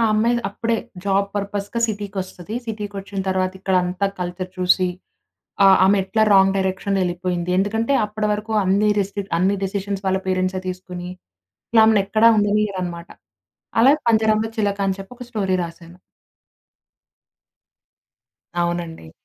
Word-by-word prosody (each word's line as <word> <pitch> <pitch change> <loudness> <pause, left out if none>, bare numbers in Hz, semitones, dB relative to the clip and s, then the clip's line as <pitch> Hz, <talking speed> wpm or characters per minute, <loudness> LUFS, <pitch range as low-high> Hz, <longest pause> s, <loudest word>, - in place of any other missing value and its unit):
అమ్మాయి 230 +3 +2
అప్పుడే 230 +3 -1 0.3
జాబ్ 200 0 +2
పర్‌పస్‌‌గా 205 +2 -3
సిటీకొస్తది. 200 -1 -5
సిటీకొచ్చిన 205 -2 -6
తర్వాత 185 0 0
ఇక్కడంతా 185 0 +1
కల్చర్ 180 +1 -4
చూసి 185 0 +3 0.8
ఆహ్, 190 -1 +7
ఆమెట్లా 200 +2 +2
రాంగ్ 195 0 +5
డైరెక్షన్‌లో 190 +1 -1
ఎళ్ళిపోయింది. 175 0 -2
ఎందుకంటే 225 +7 +1
అప్పటి 210 0 -3
వరకు 210 +2 -5
అన్ని 200 +3 +2
రెస్ట్రిక్ట్ 200 0 -3
అన్ని 190 +3 +2
డెసిషన్స్ 195 0 -3
వాళ్ళ 190 0 +1
పేరెంట్సే 185 0 0
తీసుకొని 180 -1 -6 0.8
ఆమెనెక్కడ 215 +1 +3
ఉండనీయరనమాట. 195 -5 -1 0.7
అలాగ 275 +5 +6
పంజరంలో 220 0 +2
చిలక 205 -2 0
అని 190 0 -1
చెప్పి 195 +4 -10
ఒక 250 - -7
స్టోరీ 195 -4 0
రాసాను. 170 +1 -10 2.7
అవునండి. 170 - -4
195 Hz, 110 wpm, -21 LUFS, 185-210 Hz, 2.7 s, ఆహ్